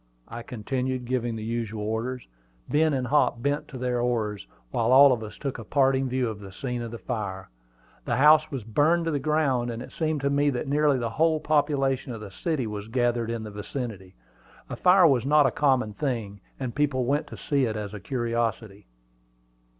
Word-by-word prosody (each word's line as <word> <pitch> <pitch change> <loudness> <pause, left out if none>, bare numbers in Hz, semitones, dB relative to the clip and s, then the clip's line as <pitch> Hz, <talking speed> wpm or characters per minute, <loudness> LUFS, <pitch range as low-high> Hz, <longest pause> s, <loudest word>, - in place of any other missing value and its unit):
I 115 +1 -7
continued, 125 +2 -3
giving 120 -2 -1
the 110 - -6
usual 110 -2 -3
orders. 115 +4 -3 0.4
Ben 155 +1 +2
and 130 -3 -1
Hop 140 -3 +2
bent 145 +1 -1
to 130 - -9
their 125 -1 -1
oars, 110 -4 -1 0.2
while - - +1
all 135 +1 +8
of 120 - -3
us 110 -1 -8
took 135 -4 -4
a - - -6
parting 135 +2 +2
view 130 -1 0
of 110 -2 -5
the 100 -2 -10
scene 125 +4 -4
of 115 - -5
the 115 - -7
fire. 100 - -5 0.5
The 120 - 0
house 155 +4 +6
was 135 -6 -5
burned 150 +10 +2
to 165 - 0
the 145 - 0
ground; 140 -4 +1
and 115 -1 -4
it 125 - -9
seemed 155 -3 -1
to 140 0 0
me 145 +1 +2
that 130 +1 -3
nearly 145 0 +3
the 120 -2 -2
whole 160 +4 +2
population 140 -3 +1
of 110 - -8
the 100 -2 -8
city 145 - -2
was 105 -1 -5
gathered 120 -1 0
in 115 -1 -3
the 105 - -7
vicinity. 105 -3 -6 0.6
A - - -3
fire 180 0 +5
was 135 -7 +4
not 150 +2 +4
a 135 - +3
common 130 -7 +1
thing, 110 -7 -3 0.2
and 130 -3 -4
people 135 -3 0
went 145 +4 0
to - - -10
see 140 -3 0
it 110 -2 -2
as 105 -1 -5
a 105 - -6
curiosity. 115 -4 -3
125 Hz, 205 wpm, -26 LUFS, 115-140 Hz, 0.6 s, all